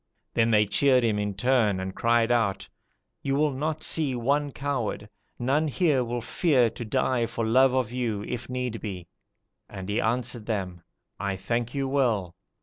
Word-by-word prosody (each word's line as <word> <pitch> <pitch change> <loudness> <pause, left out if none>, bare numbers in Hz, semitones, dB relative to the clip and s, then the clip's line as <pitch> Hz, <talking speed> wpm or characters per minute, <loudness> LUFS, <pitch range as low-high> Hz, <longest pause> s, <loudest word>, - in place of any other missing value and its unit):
Then 115 0 +3
they 105 -1 +4
cheered 130 +4 +3
him 110 -3 +1
in 105 -1 -2
turn, 110 -3 +2
and 95 0 -4
cried 115 +1 +2
out, 100 -5 +1 0.5
"'You 135 0 -1
will 150 +1 +2
not 155 +3 -3
see 150 -5 +1
one 140 +4 0
coward; 130 -7 -3 0.3
none 140 +6 +1
here 150 -4 +2
will 120 0 -3
fear 130 - +2
to - - -7
die 120 +2 0
for 115 0 -3
love 130 +3 +4
of 125 -4 0
you, 115 -5 -2
if 120 +2 -5
need 125 -3 -3
be.' 95 -5 -6 0.6
And 95 -2 -7
he 105 - +1
answered 120 -1 -2
them, 95 -6 -3 0.4
'I 100 -1 -1
thank 115 +6 -2
you 135 -1 0
well. 115 -10 +1
120 Hz, 170 wpm, -26 LUFS, 105-130 Hz, 0.6 s, they